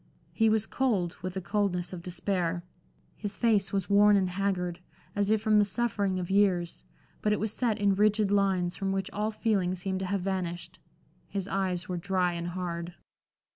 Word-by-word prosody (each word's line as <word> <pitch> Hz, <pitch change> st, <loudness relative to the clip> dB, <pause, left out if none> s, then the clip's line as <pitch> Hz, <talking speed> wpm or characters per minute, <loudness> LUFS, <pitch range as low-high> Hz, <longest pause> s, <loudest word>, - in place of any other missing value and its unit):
He 225 Hz, -1 st, +3 dB
was 220 Hz, 0 st, +2 dB
cold, 205 Hz, -12 st, 0 dB
with 185 Hz, 0 st, -5 dB
the 190 Hz, -, -2 dB
coldness 180 Hz, -1 st, -1 dB
of 175 Hz, -, -6 dB
despair. 175 Hz, -1 st, -2 dB, 0.5 s
His 205 Hz, -1 st, -4 dB
face 215 Hz, -5 st, +2 dB
was 195 Hz, -2 st, -1 dB
worn 205 Hz, 0 st, +6 dB
and 185 Hz, -2 st, +1 dB
haggard, 180 Hz, -2 st, -1 dB, 0.4 s
as 205 Hz, 0 st, +1 dB
if 215 Hz, 0 st, +2 dB
from 215 Hz, -1 st, +4 dB
the -, -, +6 dB
suffering 205 Hz, -2 st, 0 dB
of 180 Hz, 0 st, -3 dB
years, 190 Hz, -4 st, +2 dB, 0.4 s
but 210 Hz, -, +1 dB
it 210 Hz, -, +1 dB
was 215 Hz, 0 st, -2 dB
set 230 Hz, -4 st, 0 dB
in 200 Hz, -2 st, +3 dB
rigid 210 Hz, 0 st, +3 dB
lines, 190 Hz, -3 st, +2 dB
from 195 Hz, 0 st, -2 dB
which 195 Hz, 0 st, -2 dB
all 210 Hz, +1 st, -1 dB
feeling 205 Hz, -5 st, 0 dB
seemed 190 Hz, +1 st, -3 dB
to 190 Hz, -, -3 dB
have 200 Hz, 0 st, -1 dB
vanished. 180 Hz, -2 st, -3 dB, 0.5 s
His 195 Hz, -2 st, -3 dB
eyes 185 Hz, -3 st, -1 dB
were 180 Hz, -, -3 dB
dry 180 Hz, 0 st, 0 dB
and 170 Hz, 0 st, -4 dB
hard. 175 Hz, -1 st, -4 dB
195 Hz, 185 wpm, -29 LUFS, 180-205 Hz, 0.5 s, worn